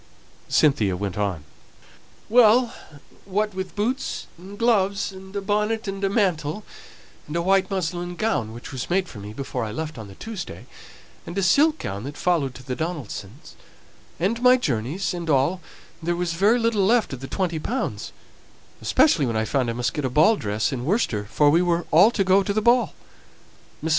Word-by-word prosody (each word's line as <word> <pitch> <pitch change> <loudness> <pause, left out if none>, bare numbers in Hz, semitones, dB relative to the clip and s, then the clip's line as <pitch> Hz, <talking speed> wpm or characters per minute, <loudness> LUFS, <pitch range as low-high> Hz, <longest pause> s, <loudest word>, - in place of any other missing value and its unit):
Cynthia 105 -11 +3
went 100 -1 -3
on, 100 -7 -2 0.8
"Well, 235 +1 +5 0.5
what 210 +2 -1
with 190 0 -5
boots 240 +6 -2
and 190 +4 -11
gloves, 200 -4 +1
and 190 +1 -12
a 200 - -1
bonnet 210 +2 0
and 195 0 -4
a 195 - +2
mantle, 185 -3 0 0.6
and 150 - -6
a 170 - +1
white 190 +1 +3
muslin 175 -2 -3
gown, 195 - -1
which 120 +4 -9
was 130 -3 -5
made 185 +1 +1
for 110 - -10
me 100 +1 -8
before 130 +2 -4
I 110 - -4
left 155 +2 -5
on 100 -3 -10
Tuesday, 195 - -7 0.6
and 170 - -6
a 195 - +1
silk 295 - +4
gown 100 - -5
that 145 +1 -7
followed 155 -8 0
to 130 - -11
the 130 0 -4
Donaldsons', 140 - -6 0.7
and 215 +7 0
my 250 +1 +6
journeys, 150 - -2
and 170 -2 -5
all, 150 +6 +2 0.4
there 175 +1 -1
was 175 -1 -1
very 205 +8 +3
little 230 -4 +1
left 225 - +2
of 130 - -5
the 135 - -7
twenty 175 -2 -2
pounds, 250 +11 -3 0.7
especially 170 - +3
when 115 -2 -1
I 110 - 0
found 125 +1 0
I - - -1
must 120 +1 -1
get 150 - -3
a 130 - 0
ball 155 - +5
dress 110 - -1
in 125 -3 -3
Worcester, 135 - 0
for 145 +7 +3
we 165 +3 +4
were 175 -1 +1
all 180 +8 +7
to 210 -4 0
go 190 +1 +4
to 200 +1 -1
the 215 - +2
Ball. 240 +2 +3 0.9
Mrs. - - 0
175 Hz, 190 wpm, -24 LUFS, 135-205 Hz, 0.9 s, all